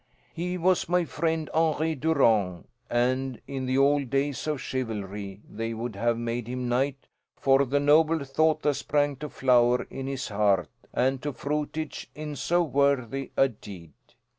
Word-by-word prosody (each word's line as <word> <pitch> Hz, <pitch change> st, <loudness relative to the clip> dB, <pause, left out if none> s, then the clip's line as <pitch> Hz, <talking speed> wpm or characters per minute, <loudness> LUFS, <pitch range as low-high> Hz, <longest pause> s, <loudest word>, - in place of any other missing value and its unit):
"He 180 Hz, +2 st, -3 dB
was 180 Hz, -1 st, +2 dB
my 180 Hz, -1 st, +2 dB
friend, 160 Hz, 0 st, -1 dB
Henri 160 Hz, 0 st, +2 dB
Durant, 115 Hz, -, +2 dB, 0.2 s
and 130 Hz, +1 st, 0 dB
in 135 Hz, -2 st, -4 dB
the 130 Hz, +1 st, +1 dB
old 140 Hz, -1 st, +3 dB
days 140 Hz, +2 st, -1 dB
of 150 Hz, -2 st, -1 dB
chivalry 105 Hz, -6 st, -4 dB
they 115 Hz, +1 st, -4 dB
would 115 Hz, -1 st, -4 dB
have 115 Hz, +3 st, +1 dB
made 120 Hz, 0 st, -3 dB
him 125 Hz, 0 st, -3 dB
knight 135 Hz, +3 st, -1 dB, 0.3 s
for 135 Hz, 0 st, +4 dB
the 145 Hz, +3 st, +1 dB
noble 155 Hz, +2 st, +4 dB
thought 155 Hz, +3 st, +1 dB
that 150 Hz, -, +3 dB
sprang 145 Hz, +1 st, 0 dB
to 150 Hz, +3 st, -6 dB
flower 125 Hz, -2 st, +3 dB
in 135 Hz, 0 st, -5 dB
his 135 Hz, -2 st, -3 dB
heart 100 Hz, -6 st, +2 dB, 0.2 s
and 130 Hz, +1 st, +1 dB
to 145 Hz, -, -2 dB
fruitage 150 Hz, +3 st, -4 dB
in 150 Hz, -1 st, -5 dB
so 175 Hz, +6 st, +1 dB
worthy 135 Hz, -3 st, 0 dB
a 135 Hz, -, +6 dB
deed. 95 Hz, -, -11 dB
135 Hz, 160 wpm, -27 LUFS, 120-150 Hz, 0.3 s, a